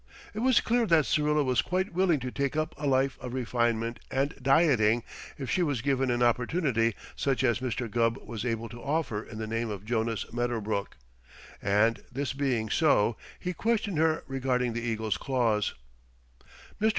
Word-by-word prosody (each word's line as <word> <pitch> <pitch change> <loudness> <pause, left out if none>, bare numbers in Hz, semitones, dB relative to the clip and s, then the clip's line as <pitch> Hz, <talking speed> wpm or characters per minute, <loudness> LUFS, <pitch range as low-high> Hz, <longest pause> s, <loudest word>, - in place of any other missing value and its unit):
It 210 - -4
was 255 +1 +4
clear 235 0 +1
that 160 -5 +4
Syrilla 150 0 +2
was 130 -3 +2
quite 185 +1 -1
willing 175 -4 +3
to 125 0 -4
take 140 +1 -1
up 155 +1 -1
a 145 +1 -3
life 135 0 +2
of 125 0 -5
refinement 120 -1 0
and 135 +2 0
dieting 125 -5 +4 0.3
if 135 - -5
she 155 +9 +1
was 145 -9 0
given 135 -2 +1
an 120 0 +1
opportunity 120 - +1 0.2
such 135 -2 0
as 120 -3 +2
Mr. 125 -1 -2
Gubb 115 +2 +1
was 115 -5 -6
able 115 -2 -2
to 120 +1 -10
offer 145 -8 -1
in 110 0 -10
the 110 - -3
name 115 +1 -2
of 100 -1 -6
Jonas 115 -1 -1
Medderbrook; 115 -4 -2 0.6
and, 105 +3 +2
this 135 +2 -2
being 130 -5 0
so, 120 -7 +3 0.2
he 180 - -3
questioned 210 -4 0
her 160 0 +2
regarding 125 -2 0
the 120 - -3
eagle's 110 -2 -1
claws. 115 -6 0 1.1
"Mr. 220 - +4
125 Hz, 175 wpm, -28 LUFS, 115-145 Hz, 1.1 s, was